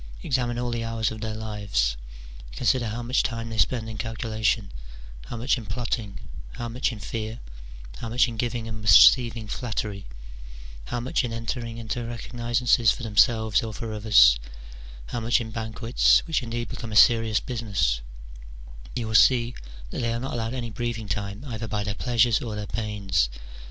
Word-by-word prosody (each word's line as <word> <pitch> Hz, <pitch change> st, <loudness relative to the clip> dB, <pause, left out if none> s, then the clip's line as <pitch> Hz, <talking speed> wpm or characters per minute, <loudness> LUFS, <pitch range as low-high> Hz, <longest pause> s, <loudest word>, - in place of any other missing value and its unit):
Examine 120 Hz, -2 st, 0 dB
all 120 Hz, 0 st, -2 dB
the 115 Hz, -1 st, -2 dB
hours 115 Hz, -1 st, -1 dB
of 110 Hz, -1 st, -7 dB
their 110 Hz, 0 st, -3 dB
lives: 100 Hz, -, -1 dB, 0.6 s
consider 120 Hz, -, +1 dB
how 120 Hz, +3 st, -4 dB
much 125 Hz, +3 st, +2 dB
time 115 Hz, -2 st, -3 dB
they 110 Hz, -, -5 dB
spend 115 Hz, -3 st, +1 dB
in 110 Hz, -1 st, -7 dB
calculation, 110 Hz, -3 st, -1 dB, 0.6 s
how 120 Hz, -, -6 dB
much 125 Hz, +3 st, +1 dB
in 110 Hz, -, -10 dB
plotting, 110 Hz, -1 st, -3 dB, 0.3 s
how 120 Hz, -, -5 dB
much 125 Hz, +3 st, -1 dB
in 110 Hz, -, -8 dB
fear, 110 Hz, +3 st, -5 dB, 0.6 s
how 115 Hz, -, -6 dB
much 125 Hz, +3 st, +3 dB
in 115 Hz, -, -6 dB
giving 120 Hz, 0 st, -2 dB
and 110 Hz, -1 st, -6 dB
receiving 115 Hz, +1 st, +6 dB
flattery, 105 Hz, -4 st, -4 dB, 0.8 s
how 120 Hz, -, -3 dB
much 130 Hz, +3 st, 0 dB
in 120 Hz, -, -3 dB
entering 115 Hz, 0 st, -4 dB
into 115 Hz, +1 st, -4 dB
recognizances 120 Hz, 0 st, +1 dB
for 125 Hz, -, -5 dB
themselves 110 Hz, 0 st, +3 dB
or 110 Hz, -2 st, -5 dB
for 115 Hz, 0 st, -5 dB
others, 105 Hz, -, +6 dB, 0.7 s
how 120 Hz, -, -3 dB
much 115 Hz, +1 st, +2 dB
in 110 Hz, -2 st, -6 dB
banquets, 110 Hz, +2 st, +2 dB
which 160 Hz, -4 st, 0 dB
indeed 120 Hz, -1 st, -4 dB
become 115 Hz, -3 st, -6 dB
a -, -, -4 dB
serious 115 Hz, -1 st, +5 dB
business, 100 Hz, -, -1 dB, 0.9 s
you 120 Hz, -, -2 dB
will 110 Hz, -, -4 dB
see 120 Hz, +1 st, +5 dB, 0.4 s
that -, -, -3 dB
they 115 Hz, -1 st, 0 dB
are 115 Hz, -, -2 dB
not 130 Hz, +2 st, -4 dB
allowed 115 Hz, +1 st, -2 dB
any 120 Hz, -3 st, -4 dB
breathing 115 Hz, -1 st, -4 dB
time 100 Hz, +5 st, -4 dB
either 115 Hz, -4 st, -5 dB
by 105 Hz, -1 st, -2 dB
their 105 Hz, 0 st, -2 dB
pleasures 120 Hz, 0 st, +2 dB
or 110 Hz, -3 st, -4 dB
their 105 Hz, 0 st, -4 dB
pains. 100 Hz, -, -1 dB
115 Hz, 175 wpm, -25 LUFS, 110-120 Hz, 0.9 s, receiving